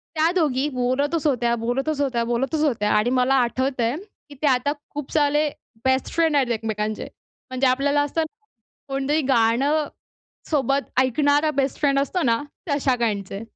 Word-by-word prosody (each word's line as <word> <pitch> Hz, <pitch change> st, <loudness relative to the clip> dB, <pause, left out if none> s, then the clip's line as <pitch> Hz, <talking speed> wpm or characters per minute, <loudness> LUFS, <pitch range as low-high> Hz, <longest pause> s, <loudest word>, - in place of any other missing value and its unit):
त्या 320 Hz, +2 st, +3 dB
दोघी 290 Hz, -4 st, +1 dB
बोलतच 280 Hz, +6 st, 0 dB
होत्या, 240 Hz, -4 st, +1 dB
बोलतच 270 Hz, +6 st, -2 dB
होत्या, 245 Hz, -4 st, 0 dB
बोलतच 265 Hz, +6 st, -1 dB
होत्या 235 Hz, -8 st, +1 dB
आणि 210 Hz, +3 st, +2 dB
मला 255 Hz, +2 st, +3 dB
आठवतंय, 255 Hz, 0 st, -1 dB, 0.3 s
की 285 Hz, -, -11 dB
ते 300 Hz, -, +2 dB
आता 260 Hz, +2 st, +2 dB, 0.2 s
खूप 295 Hz, -2 st, -6 dB
सारे 295 Hz, 0 st, +2 dB, 0.4 s
बेस्ट 260 Hz, 0 st, +2 dB
फ्रेंड 325 Hz, -3 st, +2 dB
आहेत 260 Hz, -4 st, +2 dB
एकमेकांचे. 215 Hz, -1 st, -2 dB, 0.5 s
म्हणजे 260 Hz, +1 st, +1 dB
आपल्याला 280 Hz, +3 st, +2 dB
असतं 290 Hz, +3 st, -1 dB
ना, 435 Hz, 0 st, -45 dB, 0.4 s
कोणतरी 275 Hz, +3 st, 0 dB
गाणं 270 Hz, +7 st, +2 dB, 0.6 s
सोबत 275 Hz, -2 st, +1 dB, 0.2 s
ऐकणारा 285 Hz, +4 st, +2 dB
बेस्ट 275 Hz, -1 st, 0 dB
फ्रेंड 275 Hz, -2 st, +2 dB
असतो 340 Hz, +5 st, -1 dB
ना, 230 Hz, 0 st, +1 dB, 0.3 s
तश्या 275 Hz, -2 st, +2 dB
काइंडचे. 205 Hz, -3 st, -2 dB
270 Hz, 150 wpm, -23 LUFS, 240-290 Hz, 0.6 s, त्या